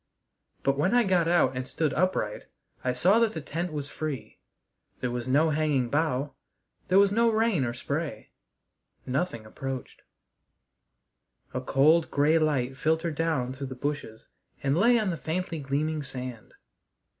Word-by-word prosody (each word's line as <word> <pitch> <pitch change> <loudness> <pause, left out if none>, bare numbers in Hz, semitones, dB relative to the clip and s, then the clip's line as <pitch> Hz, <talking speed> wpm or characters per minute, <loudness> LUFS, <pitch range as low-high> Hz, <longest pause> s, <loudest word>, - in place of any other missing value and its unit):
But 135 0 +1
when 185 +10 +2
I 245 - +5
got 180 -5 +2
out 165 -7 +3
and 130 0 -3
stood 155 -2 -1
upright 165 - 0 0.4
I 125 - +1
saw 180 - +4
that 230 -2 +2
the - - -4
tent 165 +4 -4
was 145 -2 -4
free. 140 -9 -5 0.6
There 125 - -2
was 120 0 -4
no 150 +5 +3
hanging 145 -5 +1
bough; 145 -2 0 0.5
there 185 - +4
was 200 0 +6
no 230 +2 +3
rain 220 - +2
or 120 -1 -1
spray; 140 -3 -4 0.7
nothing 130 -4 -2
approached. 130 +4 -6 1.5
A 125 - -2
cold, 150 +6 +4
gray 150 +3 +3
light 135 -5 0
filtered 160 +2 0
down 150 -5 -1
through 135 +1 -6
the 130 - -7
bushes 140 -5 -4 0.4
and 135 +1 +2
lay 235 +7 +5
on 215 -4 0
the 170 - -3
faintly 165 +1 -3
gleaming 150 +3 -1
sand. 125 -5 -7
150 Hz, 155 wpm, -27 LUFS, 130-170 Hz, 1.5 s, was